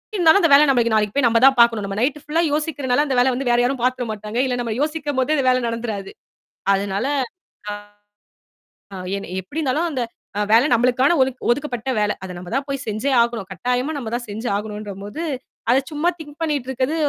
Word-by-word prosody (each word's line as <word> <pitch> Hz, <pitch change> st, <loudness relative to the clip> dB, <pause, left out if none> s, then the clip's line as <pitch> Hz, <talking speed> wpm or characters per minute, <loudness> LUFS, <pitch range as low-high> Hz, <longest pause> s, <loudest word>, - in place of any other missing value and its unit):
இருந்தாலும் 350 Hz, +1 st, +5 dB
அந்த 330 Hz, -, +4 dB
வேல 295 Hz, +2 st, +8 dB
நம்மளுக்கு 235 Hz, -4 st, +2 dB
நாளைக்கு 210 Hz, -2 st, +1 dB
போய் 280 Hz, -, +3 dB
நம்ம 230 Hz, 0 st, +3 dB
தான் 270 Hz, -, +7 dB
பார்க்கணும். 230 Hz, -3 st, +5 dB
நம்ப 195 Hz, 0 st, -4 dB
நைட் 275 Hz, +5 st, 0 dB
ஃபுல்லா 315 Hz, +3 st, 0 dB
யோசிக்கிறனால 290 Hz, -3 st, 0 dB
அந்த 270 Hz, -3 st, -1 dB
வேலைய 250 Hz, +1 st, +4 dB
வந்து 270 Hz, 0 st, -3 dB
வேற 240 Hz, 0 st, +3 dB
யாரும் 255 Hz, +1 st, 0 dB
பார்த்துற 255 Hz, 0 st, 0 dB
மாட்டாங்க. 215 Hz, +2 st, -6 dB
இல்ல 250 Hz, -, -1 dB
நம்ப 230 Hz, -2 st, -2 dB
யோசிக்கும்போதே 295 Hz, -2 st, 0 dB
அந்த 270 Hz, -3 st, 0 dB
வேல 255 Hz, 0 st, +3 dB
நடந்துராது. 225 Hz, -4 st, -4 dB, 0.6 s
அதனால, 200 Hz, +4 st, -1 dB, 0.6 s
அ -, -, -2 dB, 1.4 s
என்ன 200 Hz, -, -6 dB
எப்பிடி 290 Hz, -, -6 dB
இருந்தாலும் 305 Hz, +4 st, 0 dB
அந்த 260 Hz, -4 st, -2 dB, 0.4 s
அ -, -, +1 dB
வேலை 235 Hz, +6 st, +6 dB
நமளுக்கான 250 Hz, +7 st, +3 dB
ஒதுக் 260 Hz, -1 st, 0 dB
ஒதுக்கப்பட்ட 255 Hz, -2 st, -2 dB
வேலை. 210 Hz, 0 st, +1 dB
அத 185 Hz, -, -6 dB
நம்ம 180 Hz, +3 st, -9 dB
தான் 275 Hz, +1 st, 0 dB
போய் 275 Hz, -1 st, -3 dB
செஞ்சே 215 Hz, +6 st, -1 dB
ஆகணும். 235 Hz, -4 st, -1 dB
கட்டாயமா 250 Hz, -, -1 dB
நம்ப 235 Hz, -5 st, -5 dB
தான் 240 Hz, -, -4 dB
செஞ்சு 220 Hz, +4 st, -5 dB
ஆகணுன்ட்றபோது, 210 Hz, -, -5 dB, 0.5 s
அத 255 Hz, -, +5 dB
சும்மா 305 Hz, +4 st, +1 dB
திங்க் 295 Hz, -1 st, -11 dB
பண்ணிட்டு 290 Hz, -5 st, -1 dB
இருக்கது, 265 Hz, +4 st, -1 dB
250 Hz, 190 wpm, -21 LUFS, 220-285 Hz, 1.4 s, வேல